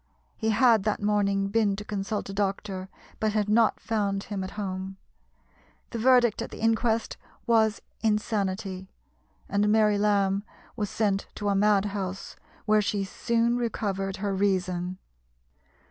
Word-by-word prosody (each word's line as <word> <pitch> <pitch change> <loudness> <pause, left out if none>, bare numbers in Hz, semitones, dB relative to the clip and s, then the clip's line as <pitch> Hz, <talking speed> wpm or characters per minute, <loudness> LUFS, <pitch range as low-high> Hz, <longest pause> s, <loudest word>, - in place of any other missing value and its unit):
He 220 - -1
had 225 0 +5
that 210 +1 -1
morning 200 -1 +1
been 205 -1 +2
to 210 +1 -7
consult 205 0 -3
a 195 - -6
doctor, 195 -1 -2 0.3
but 215 -1 0
had 210 -1 +1
not 220 +1 +3
found 200 -3 -1
him 195 -2 -4
at 190 - -5
home. 190 -1 -4 0.9
The 235 - -4
verdict 245 -2 +4
at - - -4
the - - -10
inquest 225 0 +1 0.3
was 220 -2 +2 0.2
"Insanity," 200 -3 -1 0.6
and 205 +1 +1
Mary 210 -1 +4
Lamb 200 -1 +2 0.3
was 210 -4 -2
sent 200 -2 0
to 205 -1 -2
a 200 - +2
mad 205 0 +3
house, 195 -2 -4 0.3
where 215 -1 +4
she 205 -1 -1
soon 235 +4 0
recovered 195 -5 -2
her 200 0 -2
reason. 185 -2 0
205 Hz, 145 wpm, -27 LUFS, 195-220 Hz, 0.9 s, had